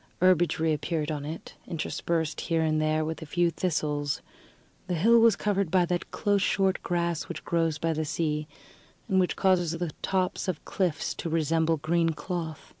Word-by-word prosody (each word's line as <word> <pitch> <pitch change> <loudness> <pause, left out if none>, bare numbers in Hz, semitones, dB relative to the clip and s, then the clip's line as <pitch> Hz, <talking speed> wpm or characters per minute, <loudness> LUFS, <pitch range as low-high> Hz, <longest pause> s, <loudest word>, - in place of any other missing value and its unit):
Herbage 175 -3 +4
reappeared 160 0 0
on 145 -2 -4
it, 160 +2 -7
interspersed 165 -1 -2
here 165 -1 0
and 155 -1 +1
there 155 0 +1
with 160 +1 -4
a 160 - -7
few 175 +2 +2
thistles; 150 -5 -1 0.6
the 180 - -1
hill 230 +8 +5
was 230 -1 +6
covered 200 -3 0
by 180 +1 +3
that 175 0 -2
close 205 -2 +1
short 195 -1 +1
grass 170 -2 -1
which - - -6
grows 165 -2 +1
by 165 +1 0
the 155 0 -1
sea, 150 -1 -1 0.6
and 190 -4 +2
causes 180 -4 +2
the 170 -1 -3
tops 185 0 -1
of 180 -5 -3
cliffs 180 -6 -1
to 165 - -5
resemble 160 0 +1
green 165 +2 +1
cloth. 165 -2 -5
165 Hz, 170 wpm, -28 LUFS, 155-180 Hz, 0.6 s, was